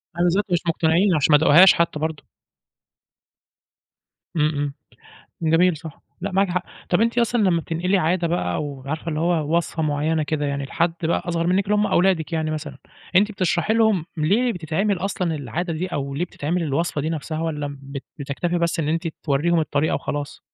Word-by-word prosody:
أيوه 175 Hz, +1 st, +1 dB
بالذات 185 Hz, +4 st, +2 dB
مش 175 Hz, -, +3 dB
مقتنعين 165 Hz, +3 st, +3 dB
عشان 150 Hz, 0 st, +2 dB
ما 150 Hz, -, +8 dB
داقوهاش 160 Hz, +5 st, +7 dB
حتى 170 Hz, -2 st, 0 dB
برضو. 155 Hz, -1 st, -3 dB, 2.1 s
امم 150 Hz, -2 st, +3 dB
امم، 145 Hz, 0 st, -2 dB, 0.8 s
جميل، 175 Hz, 0 st, +4 dB
صح، 160 Hz, -1 st, -11 dB, 0.2 s
لأ 200 Hz, +2 st, -3 dB
معاكِ 195 Hz, +1 st, +2 dB
حق. 180 Hz, +1 st, -1 dB, 0.3 s
طب 175 Hz, -, +2 dB
أنتِ 230 Hz, +1 st, +1 dB
أصلًا 235 Hz, 0 st, +2 dB
لمّا 180 Hz, -4 st, +2 dB
بتنقلي 175 Hz, +5 st, 0 dB
عادة 175 Hz, 0 st, +1 dB
بقى 125 Hz, -, -1 dB
أو 140 Hz, -3 st, -5 dB
عارفة 155 Hz, +4 st, -4 dB
اللي 150 Hz, -1 st, -2 dB
هو 165 Hz, -1 st, +1 dB
وصفة 165 Hz, -1 st, -2 dB
معينة 155 Hz, +1 st, 0 dB
كده 150 Hz, 0 st, -2 dB
يعني 140 Hz, 0 st, -2 dB
لحد 165 Hz, +5 st, 0 dB
بقى 160 Hz, -, +1 dB
أصغر 170 Hz, -1 st, -1 dB
منكِ 185 Hz, +3 st, +2 dB
اللي 210 Hz, +1 st, +1 dB
هُم 210 Hz, 0 st, +2 dB
أولادِك 175 Hz, -3 st, +2 dB
يعني 160 Hz, -1 st, -1 dB
مثلًا، 150 Hz, -3 st, -5 dB, 0.4 s
أنتِ 205 Hz, +3 st, +4 dB
بتشرحي 185 Hz, 0 st, 0 dB
لهم 220 Hz, -7 st, +2 dB
ليه 210 Hz, +11 st, +2 dB
بتتعمل 180 Hz, +4 st, -1 dB
أصلًا 180 Hz, -3 st, -2 dB
العادة 155 Hz, +6 st, -3 dB
دي 170 Hz, +4 st, -2 dB
أو 140 Hz, -4 st, -4 dB
ليه 160 Hz, +6 st, -1 dB
بتتعمل 170 Hz, +1 st, -2 dB
الوصفة 155 Hz, +1 st, -1 dB
دي 155 Hz, -, -2 dB
نفسها، 155 Hz, 0 st, -4 dB
والّا 150 Hz, -3 st, -3 dB
بت 140 Hz, 0 st, -7 dB, 0.2 s
بتكتفي 150 Hz, +5 st, -2 dB
بس 170 Hz, 0 st, 0 dB
إن 150 Hz, -, -1 dB
أنتِ 165 Hz, +2 st, -1 dB, 0.2 s
تورّيهم 160 Hz, +4 st, +2 dB
الطريقة 155 Hz, -1 st, 0 dB
وخلاص؟ 145 Hz, -1 st, -4 dB
165 Hz, 185 wpm, -22 LUFS, 150-180 Hz, 2.1 s, ما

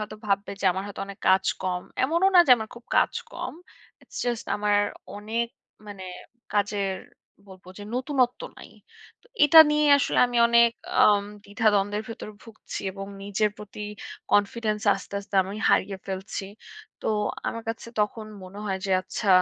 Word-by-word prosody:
হয়তো 215 Hz, 0 st, -6 dB
ভাববে 200 Hz, 0 st, 0 dB
যে -, -, -5 dB
আমার 190 Hz, +1 st, -4 dB
হয়তো 205 Hz, -, -8 dB
অনেক 200 Hz, -1 st, -10 dB
কাজ 190 Hz, 0 st, +4 dB, 0.2 s
কম। 180 Hz, -1 st, -2 dB, 0.2 s
এমনও 335 Hz, +7 st, +3 dB
না -, -, +10 dB
যে -, -, +2 dB
আমার 220 Hz, -1 st, -6 dB
খুব 240 Hz, -, -13 dB
কাজ -, -, +3 dB, 0.2 s
কম। -, -, -5 dB, 0.5 s
ইটস -, -, -10 dB
জাস্ট 240 Hz, -2 st, -2 dB
আমার 205 Hz, 0 st, +2 dB, 0.4 s
অনেক 220 Hz, +3 st, -2 dB, 0.4 s
মানে 200 Hz, -2 st, -8 dB, 0.5 s
কাজের 200 Hz, -1 st, 0 dB, 0.5 s
বলব 185 Hz, -1 st, -14 dB
যে -, -, -8 dB
নতুণত্ব 255 Hz, -1 st, 0 dB, 0.2 s
নাই। -, -, -12 dB, 0.5 s
তো -, -, -24 dB, 0.2 s
এটা 305 Hz, +2 st, +8 dB
নিয়ে 300 Hz, 0 st, +2 dB
আসলে 275 Hz, -, 0 dB
আমি 245 Hz, 0 st, -4 dB
অনেক 235 Hz, 0 st, +6 dB, 0.3 s
আম 205 Hz, -1 st, +5 dB, 0.2 s
দ্বিধা-দ্বন্দ্বের 205 Hz, 0 st, +1 dB
ভেতরে 225 Hz, -1 st, -8 dB
ভুগছি 225 Hz, -2 st, -8 dB
এবং 195 Hz, 0 st, -7 dB, 0.2 s
নিজের 205 Hz, +1 st, 0 dB
প্রতি 210 Hz, 0 st, -10 dB, 0.5 s
কনফিডেন্স 210 Hz, +1 st, +1 dB
আস্তে, -, -, -9 dB
আস্তে 200 Hz, 0 st, -12 dB
আমি 195 Hz, +3 st, -7 dB
হারিয়ে 195 Hz, 0 st, +1 dB
ফেলছি। 195 Hz, +1 st, -5 dB, 0.6 s
তো -, -, -6 dB, 0.4 s
আমার 230 Hz, -, -5 dB
কাছে 225 Hz, 0 st, -4 dB
তখন 215 Hz, +1 st, -2 dB, 0.2 s
মনে 185 Hz, +2 st, -11 dB
হয় 190 Hz, -1 st, -1 dB
যে -, -, -3 dB
আচ্ছা 200 Hz, +2 st, -4 dB
210 Hz, 160 wpm, -25 LUFS, 200-230 Hz, 0.6 s, না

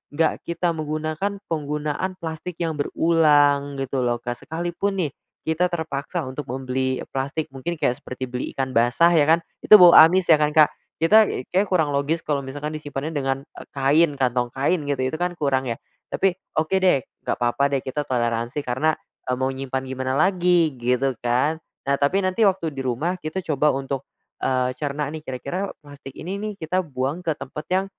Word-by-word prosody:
enggak 160 Hz, 0 st, +1 dB
kita 170 Hz, +1 st, 0 dB
menggunakan 155 Hz, +5 st, -3 dB, 0.2 s
penggunaan 150 Hz, +4 st, -2 dB
plastik 165 Hz, +1 st, -6 dB
yang 160 Hz, -3 st, -3 dB
berulang 145 Hz, -3 st, +3 dB
gitu 135 Hz, -1 st, -2 dB
loh, 120 Hz, -1 st, +1 dB
Kak. 120 Hz, 0 st, -4 dB
Sekalipun 175 Hz, +5 st, -2 dB
nih, 145 Hz, -, -2 dB, 0.3 s
kita 160 Hz, +3 st, +1 dB
terpaksa 160 Hz, 0 st, -3 dB
untuk 130 Hz, +3 st, -6 dB
membeli 130 Hz, 0 st, -2 dB
plastik 135 Hz, +3 st, -3 dB
mungkin 170 Hz, +6 st, -4 dB
kayak 125 Hz, -4 st, 0 dB
seperti 130 Hz, 0 st, -5 dB
beli 125 Hz, 0 st, -4 dB
ikan 130 Hz, -1 st, -2 dB
basah 125 Hz, +9 st, +4 dB
ya 155 Hz, -2 st, +4 dB
kan, 165 Hz, -, +6 dB, 0.2 s
itu -, -, +8 dB
bau 175 Hz, -2 st, +8 dB
amis 175 Hz, +3 st, +7 dB
ya 155 Hz, -, +6 dB
kan, 150 Hz, -, +3 dB
Kak, 155 Hz, -1 st, +6 dB, 0.3 s
kita 210 Hz, +6 st, +5 dB, 0.2 s
kayaknya 190 Hz, +3 st, +2 dB
kurang 160 Hz, -6 st, +2 dB
logis 150 Hz, +4 st, 0 dB
kalau 145 Hz, -2 st, 0 dB
misalkan 145 Hz, +3 st, -5 dB
disimpannya 150 Hz, 0 st, -5 dB
dengan, 135 Hz, -2 st, 0 dB
eee, -, -, -13 dB
kain 145 Hz, +4 st, +3 dB
kantong 125 Hz, -2 st, +1 dB
kain 145 Hz, +7 st, 0 dB
gitu 140 Hz, -2 st, 0 dB
itu 145 Hz, +5 st, -2 dB
kan 175 Hz, -1 st, -1 dB
kurang 135 Hz, -3 st, 0 dB
ya 115 Hz, -, -2 dB, 0.3 s
tapi, 195 Hz, -1 st, +2 dB, 0.3 s
oke 160 Hz, +5 st, +2 dB
deh 180 Hz, -8 st, +4 dB, 0.2 s
nggak -, -, +1 dB
apa-apa 130 Hz, +4 st, +1 dB
deh -, -, -4 dB
kita 135 Hz, +3 st, -3 dB
toleransi 120 Hz, +2 st, -1 dB
karena, 145 Hz, +6 st, +1 dB, 0.3 s
eee, 125 Hz, -, +2 dB
mau 130 Hz, 0 st, 0 dB
nyimpen 130 Hz, 0 st, -3 dB
gimana 130 Hz, 0 st, -3 dB
lagi 175 Hz, -1 st, +3 dB
gitu 125 Hz, +2 st, +1 dB
kan. 130 Hz, +7 st, +1 dB, 0.3 s
Nah, 140 Hz, -, +2 dB
tapi 185 Hz, +8 st, +2 dB
nanti 185 Hz, +4 st, -1 dB
waktu 180 Hz, -5 st, 0 dB
di 135 Hz, -, -7 dB
rumah 140 Hz, +9 st, -1 dB
kita 155 Hz, +4 st, -5 dB
coba 150 Hz, 0 st, +2 dB
untuk, 135 Hz, 0 st, -3 dB, 0.4 s
eee, 130 Hz, -1 st, +1 dB
cerna 145 Hz, -1 st, -2 dB
nih 155 Hz, -, -6 dB
kira-kira 140 Hz, +10 st, -4 dB
plastik 145 Hz, -2 st, -12 dB
ini 185 Hz, +5 st, -5 dB
nih, 215 Hz, 0 st, -3 dB
kita 180 Hz, +4 st, 0 dB
buang 140 Hz, +4 st, -3 dB
ke 160 Hz, -, +1 dB
tempat 150 Hz, +3 st, -7 dB
yang, 190 Hz, +1 st, +1 dB
150 Hz, 180 wpm, -23 LUFS, 130-165 Hz, 0.4 s, itu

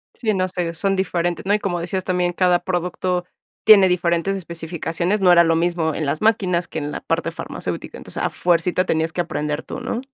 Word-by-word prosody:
Sí, 220 Hz, -3 st, -1 dB
no 185 Hz, -1 st, 0 dB
sé, 180 Hz, -2 st, -2 dB
son 195 Hz, +4 st, 0 dB
diferentes, 175 Hz, -2 st, -1 dB
¿no? 200 Hz, -, +2 dB
Y 210 Hz, -, +2 dB
como 175 Hz, -4 st, -2 dB
decías 185 Hz, +2 st, -3 dB
también, 180 Hz, -1 st, 0 dB
cada 180 Hz, 0 st, +2 dB
producto 180 Hz, 0 st, -2 dB, 0.4 s
tiene 200 Hz, -3 st, +8 dB
diferentes 175 Hz, +1 st, +1 dB
especificaciones, 170 Hz, +2 st, -2 dB
no 190 Hz, -2 st, +4 dB
era 170 Hz, -1 st, +7 dB
lo 165 Hz, -1 st, +2 dB
mismo 165 Hz, -2 st, 0 dB
en 155 Hz, -, -3 dB
las 145 Hz, +2 st, -2 dB
máquinas 185 Hz, -5 st, +1 dB
que 160 Hz, -, -4 dB
en 145 Hz, 0 st, -4 dB
la -, -, -5 dB
parte -, -, -1 dB
farmacéutica, -, -, -4 dB
entonces -, -, -4 dB
a -, -, +1 dB
fuercita 180 Hz, +1 st, +1 dB
tenías 160 Hz, -1 st, 0 dB
que 170 Hz, -, -6 dB
aprender 150 Hz, -2 st, -3 dB
tú, -, -, -7 dB
¿no? 235 Hz, -, -3 dB
175 Hz, 205 wpm, -21 LUFS, 170-185 Hz, 0.4 s, tiene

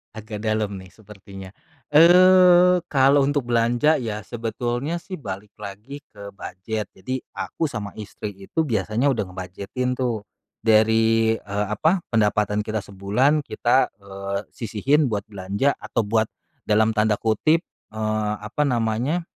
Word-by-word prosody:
Agak 110 Hz, 0 st, -7 dB
dalem 110 Hz, -2 st, -1 dB
nih 95 Hz, -1 st, -11 dB
sepertinya. 95 Hz, -3 st, -12 dB, 0.4 s
Eee, 180 Hz, +2 st, +6 dB
kalau 140 Hz, 0 st, +4 dB
untuk 140 Hz, -3 st, 0 dB
belanja 120 Hz, +6 st, +3 dB
ya 110 Hz, -4 st, -3 dB
sebetulnya 120 Hz, +7 st, -3 dB
sih 185 Hz, +2 st, -8 dB
balik 100 Hz, -, -8 dB
lagi 110 Hz, +9 st, -9 dB
ke 100 Hz, -1 st, -11 dB
budget. 105 Hz, +3 st, -5 dB
Jadi 130 Hz, +7 st, -5 dB
aku -, -, -5 dB
sama 105 Hz, -9 st, -4 dB
istri 105 Hz, -1 st, -7 dB
itu 100 Hz, -, -6 dB
biasanya 110 Hz, +3 st, 0 dB
udah 115 Hz, -7 st, +1 dB
nge-budget-in 100 Hz, +8 st, -4 dB
tuh 120 Hz, -5 st, -2 dB, 0.3 s
dari, 110 Hz, 0 st, +3 dB
eee, 105 Hz, +1 st, -3 dB
apa, 160 Hz, -, +1 dB
pendapatan 105 Hz, -1 st, +1 dB
kita 110 Hz, 0 st, -3 dB
sebulan 120 Hz, +11 st, +2 dB
kita, 130 Hz, -2 st, +1 dB, 0.2 s
eee, 100 Hz, 0 st, -4 dB
sisihin 130 Hz, +7 st, 0 dB
buat 105 Hz, -3 st, -2 dB
belanja 100 Hz, +8 st, -1 dB
atau 115 Hz, -, -2 dB
buat 110 Hz, +1 st, +1 dB, 0.4 s
dalam 110 Hz, +1 st, +3 dB
tanda 110 Hz, -1 st, +2 dB
kutip, 155 Hz, -, +1 dB, 0.3 s
eee, 110 Hz, -1 st, -1 dB
apa 105 Hz, +8 st, -2 dB
namanya, 125 Hz, +7 st, 0 dB
110 Hz, 135 wpm, -23 LUFS, 105-135 Hz, 0.4 s, Eee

